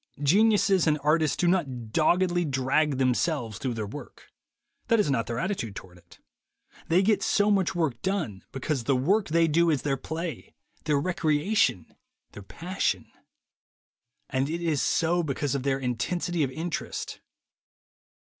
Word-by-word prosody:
Geniuses 195 Hz, +2 st, +4 dB
and 150 Hz, -1 st, +3 dB
artists 155 Hz, 0 st, +2 dB
do 175 Hz, -, +1 dB
not 135 Hz, -11 st, -1 dB
doggedly 175 Hz, +5 st, +2 dB
drag 140 Hz, 0 st, +1 dB
themselves 130 Hz, -2 st, 0 dB
through 125 Hz, -3 st, -2 dB
their 110 Hz, -2 st, -3 dB
work. 115 Hz, +9 st, -11 dB, 0.6 s
That 230 Hz, -2 st, +3 dB
is 175 Hz, -9 st, +2 dB
not 115 Hz, -4 st, 0 dB
their 115 Hz, -, -3 dB
attitude 145 Hz, -, -3 dB
toward 90 Hz, -2 st, -11 dB
it. -, -, -20 dB, 0.7 s
They 175 Hz, +4 st, +3 dB
get 205 Hz, -1 st, +2 dB
so 205 Hz, +1 st, +2 dB
much 190 Hz, -3 st, +1 dB
work 140 Hz, -9 st, -1 dB
done 170 Hz, -, -2 dB
because 135 Hz, -2 st, -3 dB
the 135 Hz, -, +2 dB
work 190 Hz, +12 st, +2 dB
they 165 Hz, +1 st, +3 dB
do 170 Hz, +2 st, +3 dB
is 145 Hz, -5 st, 0 dB
their 140 Hz, -2 st, 0 dB
play, 160 Hz, +3 st, -6 dB, 0.3 s
their 150 Hz, -2 st, +2 dB
recreation, 160 Hz, -, +1 dB, 0.5 s
their 105 Hz, -, -10 dB
passion. 180 Hz, -, -3 dB, 1.2 s
And 135 Hz, +1 st, -1 dB
it 170 Hz, +2 st, -3 dB
is 155 Hz, -5 st, +1 dB
so 175 Hz, +1 st, +1 dB
because 145 Hz, -3 st, -2 dB
of 140 Hz, -, -1 dB
their 135 Hz, 0 st, 0 dB
intensity 135 Hz, +8 st, -2 dB
of 140 Hz, -, +1 dB
interest. 160 Hz, +6 st, -5 dB
155 Hz, 150 wpm, -27 LUFS, 130-175 Hz, 1.2 s, Geniuses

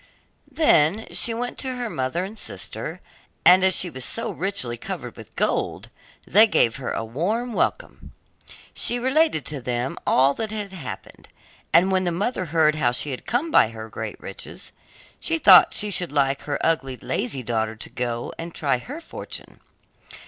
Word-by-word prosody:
Then 205 Hz, -, +3 dB
she 235 Hz, -, +5 dB
went 245 Hz, +4 st, -3 dB
in 260 Hz, -1 st, -2 dB
to -, -, -7 dB
her 245 Hz, -1 st, -3 dB
mother 135 Hz, -, -2 dB
and 205 Hz, +3 st, -9 dB
sister, -, -, -5 dB, 0.4 s
and 185 Hz, +1 st, +7 dB
as 190 Hz, -1 st, +5 dB
she 185 Hz, -, +2 dB
was 130 Hz, -7 st, -7 dB
so -, -, -2 dB
richly 170 Hz, -8 st, -1 dB
covered -, -, -7 dB
with -, -, -13 dB
gold, -, -, -1 dB, 0.3 s
they 215 Hz, +5 st, +6 dB
gave 115 Hz, -, +2 dB
her 135 Hz, -, -5 dB
a 115 Hz, -, -3 dB
warm 210 Hz, -, -2 dB
welcome. -, -, -2 dB, 0.6 s
She 240 Hz, -, +1 dB
related 260 Hz, -, +2 dB
to 145 Hz, -1 st, -5 dB
them 125 Hz, +1 st, -3 dB
all 135 Hz, +2 st, +4 dB
that 220 Hz, +5 st, -4 dB
had 205 Hz, -2 st, -5 dB
happened, 185 Hz, -, -9 dB, 0.4 s
and 185 Hz, +3 st, +5 dB
when 185 Hz, -1 st, +1 dB
the 175 Hz, -, +1 dB
mother 190 Hz, +3 st, -2 dB
heard 160 Hz, -1 st, +3 dB
how 150 Hz, -5 st, +1 dB
she 140 Hz, +4 st, -1 dB
had 130 Hz, -, -6 dB
come 260 Hz, +9 st, -1 dB
by -, -, +6 dB
her 110 Hz, -1 st, -9 dB
great -, -, -6 dB
riches, -, -, -9 dB, 0.5 s
she 165 Hz, -, 0 dB
thought 185 Hz, +2 st, +7 dB
she 210 Hz, 0 st, +1 dB
should 180 Hz, -3 st, 0 dB
like 140 Hz, -2 st, +1 dB
her 145 Hz, -, -1 dB
ugly, 135 Hz, -6 st, 0 dB
lazy 130 Hz, +1 st, -3 dB
daughter 110 Hz, -1 st, -2 dB
to 110 Hz, -, -8 dB
go 120 Hz, -2 st, -3 dB
and 165 Hz, 0 st, -7 dB
try 140 Hz, -4 st, 0 dB
her 285 Hz, -, -8 dB
fortune. -, -, -9 dB
165 Hz, 180 wpm, -23 LUFS, 130-215 Hz, 0.6 s, and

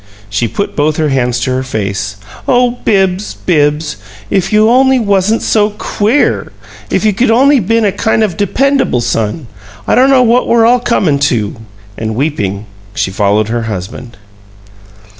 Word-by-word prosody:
She 105 Hz, +3 st, 0 dB
put 200 Hz, -, -4 dB
both 150 Hz, +1 st, 0 dB
her 155 Hz, -1 st, 0 dB
hands 125 Hz, -2 st, -1 dB
over 130 Hz, 0 st, 0 dB
her 130 Hz, -, -2 dB
face. 100 Hz, -4 st, -3 dB, 0.3 s
"Oh, 245 Hz, -1 st, +2 dB
Bibbs, 195 Hz, -1 st, 0 dB
Bibbs! 150 Hz, -, 0 dB, 0.3 s
if 190 Hz, +1 st, 0 dB
you 215 Hz, 0 st, +4 dB
only 260 Hz, +2 st, +4 dB
wasn't 205 Hz, -1 st, +1 dB
so 210 Hz, -1 st, +1 dB
QUEER! 220 Hz, +7 st, 0 dB, 0.4 s
If -, -, 0 dB
you 210 Hz, -, +3 dB
could 235 Hz, +6 st, +1 dB
only 270 Hz, +4 st, +4 dB
been 225 Hz, +2 st, +1 dB
a 200 Hz, -, +2 dB
kind 220 Hz, +2 st, 0 dB
of 195 Hz, -6 st, -1 dB
dependable 260 Hz, -, 0 dB
son! 115 Hz, +5 st, -2 dB, 0.4 s
I -, -, +2 dB
don't 260 Hz, +2 st, +4 dB
know 265 Hz, -2 st, +5 dB
what 240 Hz, +1 st, +2 dB
we're 230 Hz, -1 st, +3 dB
all 245 Hz, +2 st, +4 dB
comin' 185 Hz, -12 st, 0 dB
to!" 110 Hz, -5 st, -2 dB, 0.4 s
And, 110 Hz, 0 st, -3 dB
weeping, 110 Hz, -8 st, -2 dB, 0.3 s
she 95 Hz, -, -1 dB
followed 105 Hz, +2 st, +1 dB
her 120 Hz, +1 st, -1 dB
husband. 110 Hz, +5 st, -7 dB
185 Hz, 160 wpm, -12 LUFS, -, 0.4 s, know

